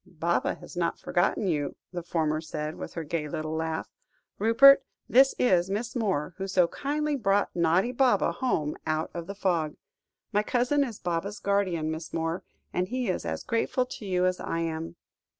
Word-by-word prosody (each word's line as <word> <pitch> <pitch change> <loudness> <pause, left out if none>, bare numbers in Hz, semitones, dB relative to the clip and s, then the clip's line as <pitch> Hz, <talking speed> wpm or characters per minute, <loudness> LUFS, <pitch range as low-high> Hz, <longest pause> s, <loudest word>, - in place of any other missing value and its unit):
"Baba 170 -2 -1
has - - -12
not 170 -1 0
forgotten 175 +3 0
you," 150 -6 -1 0.2
the 175 - -3
former 160 -2 0
said, 155 -1 -4
with - - -8
her 165 - -3
gay 155 0 -2
little 155 +1 -3
laugh. 160 0 -2 0.5
"Rupert, 230 +6 +7 0.2
this 265 +2 +5
is 185 -6 +3
Miss 225 +5 -3
Moore, 190 -9 0
who 195 - -3
so 185 -2 +3
kindly 300 +1 -1
brought 200 -5 +1
naughty 170 +7 +3
Baba 255 0 +3
home 245 - -1
out 155 0 -1
of 170 -1 -6
the 200 - -6
fog. 170 -6 0 0.6
My 205 - +4
cousin 250 +6 +2
is 235 -6 -5
Baba's 175 +4 -2
guardian, 185 -6 0
Miss 160 0 -6
Moore, 165 +2 -1 0.3
and 180 +1 0
he 250 -1 -2
is 185 - -2
as - - -3
grateful 240 +2 0
to 250 - -9
you 180 -1 +2
as 185 0 +1
I 165 - -2
am." 165 0 -3
180 Hz, 180 wpm, -28 LUFS, 160-225 Hz, 0.6 s, Rupert